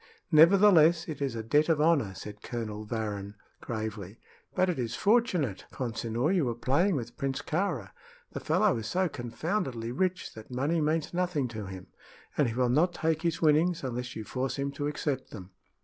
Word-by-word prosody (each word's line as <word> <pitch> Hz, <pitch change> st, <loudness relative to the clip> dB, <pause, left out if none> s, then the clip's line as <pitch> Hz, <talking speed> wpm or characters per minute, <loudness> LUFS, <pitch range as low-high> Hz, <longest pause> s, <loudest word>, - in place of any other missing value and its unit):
"Nevertheless, 170 Hz, 0 st, +6 dB
it 150 Hz, -4 st, -6 dB
is 135 Hz, -4 st, -1 dB
a 110 Hz, -, -4 dB
debt 150 Hz, +8 st, +2 dB
of 160 Hz, -2 st, +3 dB
honor," 150 Hz, -11 st, +2 dB
said 105 Hz, +1 st, -9 dB
Colonel 110 Hz, -3 st, -5 dB
Varrin, 105 Hz, -3 st, -4 dB, 0.3 s
gravely. 110 Hz, -3 st, -5 dB, 0.4 s
"But 185 Hz, -, +3 dB
it 175 Hz, -6 st, -1 dB
is 115 Hz, -2 st, -2 dB
fortunate, 185 Hz, -, +1 dB
Consinor, 120 Hz, +4 st, -1 dB
you 175 Hz, -7 st, +2 dB
were 120 Hz, -2 st, -1 dB
playing 145 Hz, -, +2 dB
with 120 Hz, -4 st, -5 dB
Prince 135 Hz, -1 st, -2 dB
Kāra. 155 Hz, -, -2 dB, 0.4 s
The -, -, -5 dB
fellow -, -, +2 dB
is 110 Hz, -1 st, -5 dB
so 185 Hz, +7 st, +1 dB
confoundedly 125 Hz, -, -3 dB
rich 185 Hz, +6 st, -1 dB
that 110 Hz, -1 st, -11 dB
money 140 Hz, +6 st, 0 dB
means 155 Hz, +2 st, 0 dB
nothing 175 Hz, -7 st, 0 dB
to 110 Hz, -3 st, -6 dB
him, 95 Hz, -1 st, -8 dB, 0.5 s
and 145 Hz, -, +3 dB
he 115 Hz, -, -3 dB
will 125 Hz, -1 st, +2 dB
not 170 Hz, +7 st, +2 dB
take 160 Hz, -1 st, 0 dB
his 170 Hz, -1 st, -1 dB
winnings 160 Hz, +2 st, +3 dB
unless 125 Hz, -1 st, -4 dB
you 110 Hz, -, -5 dB
force 130 Hz, +3 st, -3 dB
him 140 Hz, 0 st, -2 dB
to 145 Hz, +1 st, -3 dB
accept 145 Hz, -2 st, -2 dB
them." 95 Hz, -3 st, -10 dB
135 Hz, 180 wpm, -29 LUFS, 115-165 Hz, 0.5 s, Nevertheless